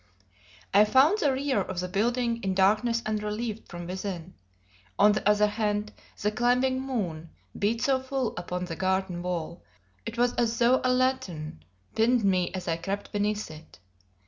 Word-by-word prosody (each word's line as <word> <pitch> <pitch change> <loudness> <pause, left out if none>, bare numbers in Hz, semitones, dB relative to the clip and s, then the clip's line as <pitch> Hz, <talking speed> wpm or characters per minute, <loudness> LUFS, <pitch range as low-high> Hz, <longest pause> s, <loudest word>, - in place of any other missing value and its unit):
I 205 +2 +7
found 270 - +4
the 290 -7 +3
rear 265 -4 0
of 185 -1 -4
the 180 - -2
building 235 +4 0
in 190 -1 -1
darkness 215 +5 +2
unrelieved 215 +1 -3
from 175 -1 -7
within; 185 -1 -5 0.6
on 210 +1 +6
the 210 0 +1
other 210 0 +4
hand, 210 0 -1 0.3
the 210 - 0
climbing 250 +3 +2
moon 180 -12 -3 0.3
beat 225 +3 0
so 265 -2 +2
full 260 -3 -2
upon 180 0 -4
the 170 -2 -5
garden 190 -1 -1
wall, 175 -2 -4 0.4
it 230 +1 -6
was 245 0 +2
as 230 -1 +1
though 245 +2 +4
a 255 - +2
lantern 250 - -1 0.3
pinned 235 +1 +3
me 185 -2 +2
as 185 - -5
I 165 -1 0
crept 195 +4 -4
beneath 210 -1 -1
it. 155 +1 -13
210 Hz, 165 wpm, -27 LUFS, 185-240 Hz, 0.6 s, I